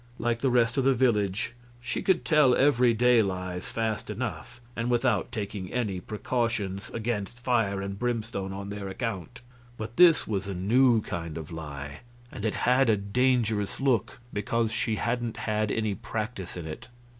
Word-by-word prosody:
Like 115 0 0
the 135 - +2
rest 120 +1 +3
of - - +2
the 135 0 +4
village, 105 -3 +1 0.3
she 120 - -3
could 185 -3 +2
tell 150 -6 +5
every 125 -3 +4
day 120 +1 +5
lies 90 -2 -3
fast 110 -2 -2
enough 120 +1 -5 0.2
and 115 +1 -2
without 120 -4 +1
taking 100 -3 -4
any 110 -7 -1
precautions 105 -2 -2
against 115 0 -3
fire 115 -6 +1
and 100 0 -5
brimstone 115 -5 -2
on 100 +1 -6
their 100 -1 -5
account; 115 +3 -4 0.4
but 110 +2 -6
this 175 -3 +7
was 100 -2 -2
a 100 - -3
new 115 +5 +4
kind 85 -5 -5
of 80 -1 -7
lie, 75 -2 -7 0.3
and 105 - -6
it 110 - 0
had 125 0 +4
a 110 - +4
dangerous 110 0 +1
look 130 -4 +1
because 110 +2 0
she 115 0 0
hadn't 120 +1 -2
had 110 -1 -1
any 110 -1 0
practice 105 -3 -5
in 85 - -6
it. 80 +7 -7
110 Hz, 165 wpm, -28 LUFS, 100-120 Hz, 0.4 s, this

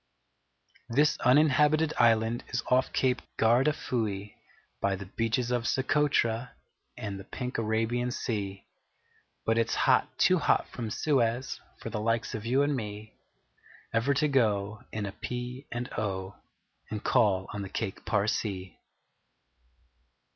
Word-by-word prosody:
THIS 145 +6 +3
Uninhabited 150 +3 +4
Island 115 0 +3
Is 120 -1 -2
off 130 +1 +3
Cape 130 -1 +1 0.2
Gardafui, 115 -4 +1 0.5
By 100 0 +1
the 100 +1 -7
Beaches 115 +5 -1
of 120 -1 0
Socotra 125 -4 +1 0.4
And 100 -2 -5
the - - -8
Pink 125 +4 -4
Arabian 115 +2 0
Sea: 100 -5 -3 0.8
But 115 +1 +2
it's 115 - +1
hot - - +3
too - - +4
hot - - +2
from 115 -2 -5
Suez 125 0 0 0.2
For - - -7
the 105 - -2
likes 115 +2 0
of 110 -1 -4
you 135 +4 +3
and 145 0 +1
me 105 -2 -6 0.8
Ever 125 +5 +2
to 150 +3 +2
go 110 -5 +1
In 105 -2 -3
a 100 - -4
P. 125 +5 -6
and 120 +1 -3
O. 95 -2 -3 0.6
And 105 -1 -4
call 100 -7 +3
on 105 - -4
the 95 - -6
Cake 100 -1 -4
Parsee! 100 -3 -1
115 Hz, 135 wpm, -29 LUFS, 105-125 Hz, 0.8 s, Uninhabited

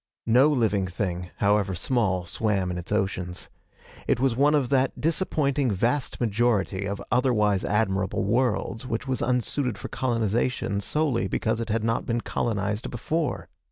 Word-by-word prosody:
No 125 +6 +5
living 110 -9 +1
thing, 90 -1 -3
however 100 -2 +2
small, 95 -3 0
swam 95 0 -1
in 90 - -3
its 90 - -9
oceans. 95 -4 -2 0.6
It - - +2
was 130 -2 +2
one 145 +4 +4
of 135 -5 +1
that 135 -1 +1
disappointing 150 -5 +1
vast 120 +7 0
majority 105 -4 +1
of 100 0 -3
otherwise 105 -6 +2
admirable 95 -3 0
worlds 115 +2 0
which 115 +4 -3
was 130 -2 -1
unsuited 125 -1 0
for 105 - -7
colonization 115 -2 0
solely 140 -6 0
because 110 +4 -1
it 115 - -4
had 110 0 0
not 115 0 0
been 115 0 0
colonized 105 -1 -2
before. 150 +6 -2
115 Hz, 150 wpm, -26 LUFS, 100-125 Hz, 0.6 s, No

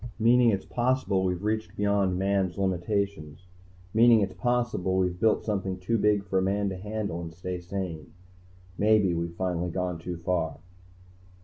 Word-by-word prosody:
"Meaning 120 +2 +5
it's 100 -3 -1
possible 120 -6 0
we've 90 0 -1
reached 110 +1 -2
beyond 100 -3 +1
Man's 95 -2 0
limitations. 95 -3 -2 0.5
Meaning 115 0 +6
it's 95 -2 -1
possible 120 -7 0
we've 90 -1 0
built 110 +1 +2
something 95 -3 -2
too 110 +5 -1
big 105 -1 +2
for 95 -1 +1
a - - +1
man 100 +1 0
to 95 - -4
handle 100 -2 -4
and 85 -1 -6
stay 90 +2 -5
sane. 90 -4 -5 0.7
Maybe 105 -3 +4
we've 85 0 -3
finally 90 -1 -1
gone 90 -1 -3
too 85 +1 -5
far." 85 -3 -1
95 Hz, 155 wpm, -27 LUFS, 90-105 Hz, 0.7 s, Meaning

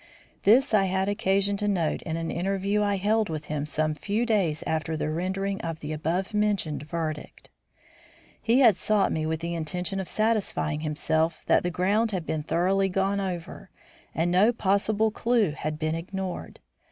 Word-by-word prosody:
This 235 +4 +5
I 200 -2 +5
had 190 +1 0
occasion 200 0 +1
to 205 0 -2
note 175 -6 0
in 160 -1 -4
an 165 0 -3
interview 195 +3 0
I 205 -1 +1
held 215 +2 +1
with 155 -1 -4
him 150 -1 -3
some 155 +1 0
few 205 +10 -1
days 190 -10 +1
after 160 0 -1
the 155 - -2
rendering 190 +4 -2
of 165 -1 -4
the 150 +1 -5
abovementioned 185 +1 -1
verdict. 155 0 -5 0.9
He 235 +4 +3
had 230 -7 +7
sought 210 -2 +2
me 155 0 -1
with 160 0 -2
the 170 0 -3
intention 180 +3 -3
of 190 - -5
satisfying 215 -8 0
himself 160 +1 -1
that - - +4
the 175 - -1
ground 200 +6 +1
had 180 -4 -2
been 155 0 -2
thoroughly 190 +5 +1
gone 195 +2 0
over, 180 -3 -5 0.5
and 170 +2 +1
no 195 +6 +5
possible 215 0 +1
clue 230 -5 +1
had 150 +1 -4
been 155 0 -1
ignored. 185 +2 -5
185 Hz, 170 wpm, -26 LUFS, 160-205 Hz, 0.9 s, had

